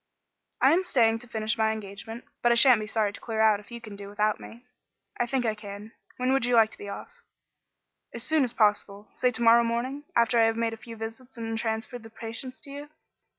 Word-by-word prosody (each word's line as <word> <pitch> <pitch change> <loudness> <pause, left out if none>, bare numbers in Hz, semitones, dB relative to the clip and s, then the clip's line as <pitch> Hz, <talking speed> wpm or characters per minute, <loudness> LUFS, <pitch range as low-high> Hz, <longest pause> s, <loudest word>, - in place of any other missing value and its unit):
"I - - +6
am 365 +3 +2
staying 235 -10 +3
on 225 - -3
to 245 - -13
finish 220 0 -2
my 220 0 +3
engagement, 220 +2 -7 0.2
but 240 - +4
I - - +5
shan't 240 -2 +7
be 215 - -5
sorry 210 -2 0
to - - -10
clear 225 -2 -4
out 215 -2 +4
if 205 - -16
you 235 - -7
can 215 -3 -10
do 200 0 -9
without 210 +1 0
me." 235 +2 -12 0.5
"I 240 - +1
think 260 -1 -1
I 220 - +1
can. 210 0 -9 0.3
When 255 +1 +1
would 270 - +2
you 245 0 +2
like 220 -1 +5
to - - -10
be 205 - -7
off?" 475 - -9 0.9
"As 235 - -5
soon 310 +2 +3
as 245 - -1
possible. 205 -2 0
Say 250 - +1
to 235 -1 -3
morrow 235 +1 +7
morning, 250 +5 -2
after 235 0 +3
I 225 - +6
have 225 0 +1
made 230 -1 0
a - - -7
few 230 +1 -10
visits 225 +3 -8
and 225 -1 -4
transferred 225 +2 -3
the 225 - -12
patients 230 +3 -7
to 280 - -11
you." 290 +1 -8
225 Hz, 240 wpm, -27 LUFS, 220-245 Hz, 0.9 s, shan't